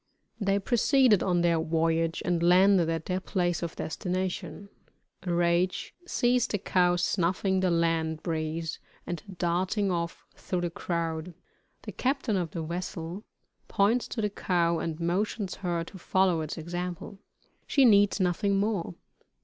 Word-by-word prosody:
They 200 Hz, -2 st, +1 dB
proceeded 240 Hz, 0 st, +3 dB
on 175 Hz, -2 st, +1 dB
their 170 Hz, -1 st, +3 dB
voyage 165 Hz, +1 st, 0 dB
and 175 Hz, -2 st, +1 dB
landed 180 Hz, 0 st, +5 dB
at 165 Hz, -1 st, -2 dB
their 185 Hz, 0 st, -1 dB
place 175 Hz, -2 st, -1 dB
of 170 Hz, -2 st, -4 dB
destination. 185 Hz, +2 st, -4 dB, 0.6 s
Rache 175 Hz, +1 st, +1 dB, 0.2 s
sees 245 Hz, -5 st, +2 dB
the 205 Hz, -, -1 dB
cow 180 Hz, -2 st, +2 dB
snuffing 180 Hz, +2 st, +1 dB
the 185 Hz, -1 st, +2 dB
land 165 Hz, -2 st, 0 dB
breeze 160 Hz, 0 st, -3 dB, 0.3 s
and 175 Hz, -3 st, -4 dB, 0.2 s
darting 185 Hz, +4 st, 0 dB
off 170 Hz, -1 st, -3 dB
through 180 Hz, -1 st, -3 dB
the 175 Hz, -1 st, -2 dB
crowd. 165 Hz, 0 st, -3 dB, 0.5 s
The -, -, -6 dB
captain 260 Hz, -4 st, -1 dB
of 175 Hz, -3 st, -1 dB
the 165 Hz, 0 st, -5 dB
vessel 170 Hz, +3 st, -5 dB, 0.4 s
points 220 Hz, +5 st, +2 dB
to 225 Hz, -, -4 dB
the 210 Hz, -, 0 dB
cow 170 Hz, -4 st, +1 dB
and 160 Hz, -1 st, -4 dB
motions 190 Hz, +3 st, -1 dB
her 175 Hz, -3 st, -2 dB
to 190 Hz, +3 st, -11 dB
follow 185 Hz, -2 st, +2 dB
its 155 Hz, +2 st, -5 dB
example. 175 Hz, +4 st, -5 dB, 0.5 s
She 275 Hz, -2 st, +4 dB
needs 205 Hz, -3 st, +5 dB
nothing 195 Hz, +2 st, +1 dB
more. 195 Hz, -4 st, -1 dB
175 Hz, 140 wpm, -28 LUFS, 170-195 Hz, 0.6 s, landed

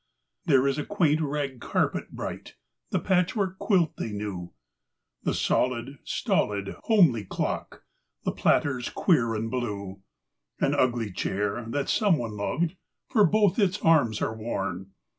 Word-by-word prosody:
There 135 Hz, -3 st, +4 dB
is 135 Hz, -, 0 dB
the 150 Hz, -, -1 dB
quaint 160 Hz, -6 st, +2 dB
rag 140 Hz, -3 st, -2 dB
carpet -, -, -1 dB
bright; -, -, -6 dB, 0.4 s
patchwork 190 Hz, +1 st, +1 dB
quilt 180 Hz, -7 st, +2 dB
they 110 Hz, -, -3 dB
knew; 100 Hz, -4 st, -5 dB, 0.7 s
The -, -, -1 dB
solid, 125 Hz, +2 st, 0 dB
stolid, 100 Hz, -1 st, -1 dB
homely 170 Hz, -, +4 dB
clock, 95 Hz, -, -4 dB, 0.4 s
th -, -, +3 dB
ters 130 Hz, -4 st, -3 dB
queer 115 Hz, -, +2 dB
and 110 Hz, +1 st, -3 dB
blue; 100 Hz, -6 st, -4 dB, 0.6 s
An -, -, +2 dB
ugly 120 Hz, -4 st, +1 dB
chair 100 Hz, +4 st, -2 dB
that 145 Hz, +3 st, -1 dB
some 200 Hz, -7 st, +3 dB
one 115 Hz, -4 st, -4 dB
loved, 160 Hz, -, -1 dB, 0.4 s
both 210 Hz, -1 st, +4 dB
its 190 Hz, -3 st, +2 dB
arms 140 Hz, -10 st, +3 dB
are 110 Hz, -, -1 dB
worn. 95 Hz, -4 st, -4 dB
130 Hz, 130 wpm, -27 LUFS, 105-165 Hz, 0.7 s, There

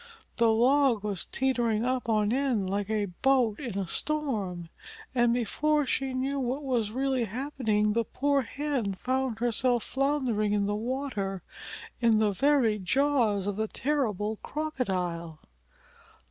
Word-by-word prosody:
The 230 Hz, -1 st, +4 dB
log 250 Hz, 0 st, +3 dB
was 200 Hz, -4 st, -2 dB
teetering 240 Hz, -4 st, 0 dB
up 255 Hz, -1 st, -1 dB
on 215 Hz, 0 st, +2 dB
end 255 Hz, -7 st, 0 dB
like 200 Hz, +1 st, -2 dB
a 215 Hz, -2 st, 0 dB, 0.2 s
boat 255 Hz, -6 st, +3 dB
in 240 Hz, -9 st, -5 dB
a 195 Hz, -, -1 dB
storm! 205 Hz, -, -1 dB, 0.4 s
And 240 Hz, -2 st, +3 dB
before 295 Hz, +6 st, +1 dB
she 270 Hz, 0 st, -1 dB
knew 270 Hz, +2 st, -1 dB
what 260 Hz, +3 st, -2 dB
was 245 Hz, -6 st, 0 dB
really 260 Hz, +1 st, 0 dB
happening 220 Hz, -3 st, 0 dB
the 230 Hz, +1 st, +1 dB
poor 280 Hz, +4 st, +1 dB
Hen 255 Hz, -5 st, -2 dB
found 255 Hz, +1 st, -1 dB
herself 240 Hz, +1 st, +1 dB
floundering 260 Hz, -7 st, 0 dB
in 205 Hz, -1 st, +1 dB
the 205 Hz, -, -1 dB
water 215 Hz, -, -3 dB, 0.6 s
in 230 Hz, -2 st, +4 dB
the 215 Hz, -1 st, +3 dB
very 240 Hz, -1 st, +2 dB
jaws 230 Hz, -2 st, +1 dB
of 205 Hz, -1 st, -2 dB
the 220 Hz, 0 st, 0 dB
terrible 220 Hz, -7 st, -1 dB
Crocodile. 185 Hz, -, -3 dB
235 Hz, 140 wpm, -28 LUFS, 210-270 Hz, 0.6 s, The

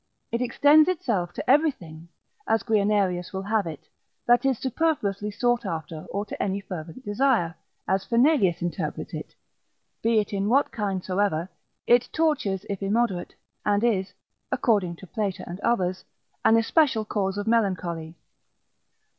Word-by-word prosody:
It 235 Hz, +1 st, -1 dB
extends 290 Hz, +6 st, +5 dB
itself 215 Hz, -, -1 dB
to -, -, -6 dB
everything, 185 Hz, -, +1 dB, 0.4 s
as 225 Hz, -2 st, +2 dB
Guianerius 200 Hz, -5 st, +1 dB
will 190 Hz, 0 st, -3 dB
have 210 Hz, -2 st, 0 dB
it, 155 Hz, -3 st, -8 dB, 0.4 s
that 240 Hz, +2 st, +4 dB
is 265 Hz, -3 st, +2 dB
superfluously 230 Hz, -8 st, -1 dB
sought 240 Hz, +3 st, 0 dB
after:' 160 Hz, -4 st, -5 dB
or 200 Hz, +2 st, -3 dB
to -, -, -6 dB
any 195 Hz, 0 st, -1 dB
fervent 180 Hz, +4 st, -8 dB
desire, 205 Hz, -6 st, +1 dB, 0.3 s
as 190 Hz, +1 st, +1 dB
Fernelius 235 Hz, -, +3 dB
interprets 175 Hz, -, -4 dB
it; -, -, -7 dB, 0.7 s
be 230 Hz, 0 st, +2 dB
it 210 Hz, -1 st, 0 dB
in 200 Hz, +1 st, 0 dB
what 275 Hz, +4 st, +3 dB
kind 195 Hz, -4 st, -2 dB
soever, 185 Hz, -3 st, 0 dB, 0.4 s
it 240 Hz, 0 st, +4 dB
tortures 260 Hz, -, 0 dB
if 200 Hz, -1 st, -4 dB
immoderate, 200 Hz, -2 st, 0 dB, 0.3 s
and 205 Hz, +1 st, +1 dB
is 200 Hz, -5 st, +1 dB, 0.4 s
(according 205 Hz, -9 st, +1 dB
to 190 Hz, -, -12 dB
Plater 200 Hz, 0 st, -3 dB
and 175 Hz, +2 st, -7 dB
others) 185 Hz, -5 st, 0 dB, 0.4 s
an 225 Hz, -, +5 dB
especial 230 Hz, -1 st, +2 dB
cause 195 Hz, -2 st, -1 dB
of 205 Hz, -, -2 dB
melancholy. 180 Hz, -8 st, 0 dB
205 Hz, 145 wpm, -25 LUFS, 185-240 Hz, 0.7 s, extends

